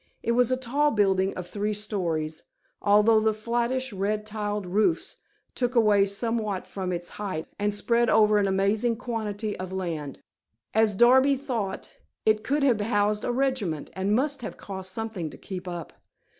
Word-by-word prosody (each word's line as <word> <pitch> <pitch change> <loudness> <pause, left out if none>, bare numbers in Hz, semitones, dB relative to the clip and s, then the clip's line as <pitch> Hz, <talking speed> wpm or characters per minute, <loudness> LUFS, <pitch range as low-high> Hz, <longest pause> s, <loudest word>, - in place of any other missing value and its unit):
It 235 - +1
was 245 +1 +3
a 255 - +2
tall 275 +4 +1
building 195 -4 +2
of 180 -1 -6
three 210 +3 -2
stories, 170 -7 -2 0.4
although 210 +2 +5
the 215 0 +1
flattish 240 +3 -1
red 210 +2 -1
tiled 210 -2 -3
roofs 210 - 0 0.4
took 245 0 -1
away 210 -3 +5
somewhat 215 -1 -2
from 185 -2 -4
its 175 0 -3
height, 190 -6 -4
and 205 0 +1
spread 235 +3 +2
over 210 -1 +5
an 200 - +2
amazing 200 +5 +1
quantity 220 -3 -3
of 185 0 -5
land. 165 -7 -4 0.6
As 220 -2 +3
Darby 260 +5 +6
thought, 235 -8 -4 0.3
it 215 0 +3
could 285 +1 0
have 240 -6 +3
housed 210 -1 +1
a - - 0
regiment, 240 - -1
and 195 +2 0
must 280 +2 0
have 230 - -6
cost 190 -1 -7
something 215 -6 -4
to - - -12
keep 185 -1 -7
up. 175 -2 -6
210 Hz, 165 wpm, -26 LUFS, 190-235 Hz, 0.6 s, Darby